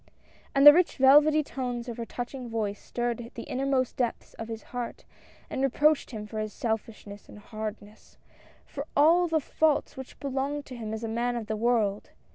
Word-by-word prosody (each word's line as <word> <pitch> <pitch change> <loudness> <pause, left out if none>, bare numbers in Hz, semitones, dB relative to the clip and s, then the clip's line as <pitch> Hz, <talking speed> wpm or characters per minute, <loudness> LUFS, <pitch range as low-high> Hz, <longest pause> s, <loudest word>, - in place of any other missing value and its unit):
And 275 +1 +5
the 295 - +13
rich 350 +2 +2
velvety 295 +3 +6
tones 250 -3 -4
of 235 - -6
her 230 -1 -5
touching 245 0 -6
voice 210 -3 -3
stirred 240 -1 -3
the 230 - -6
innermost 265 -1 -1
depths 245 -3 -2
of 225 - -5
his 225 -1 -7
heart, 245 -1 -5 0.4
and - - -4
re 270 - +3
proached 300 +3 +2
him 215 -4 -6
for 215 +1 -6
his 215 -1 -4
selfishness 220 -2 -5
and - - -12
hardness 215 0 -8 0.3
— - - -28
for 285 +1 -7
all 335 +5 +5
the 320 -1 +1
faults 310 +1 0
which 265 -1 -10
belonged 280 +1 -3
to 255 - -9
him 220 -3 -6
as 220 +1 -5
a - - -2
man 240 +2 -1
of 235 -2 -4
the 220 0 -3
world. 215 -3 0
240 Hz, 195 wpm, -28 LUFS, 220-275 Hz, 0.4 s, the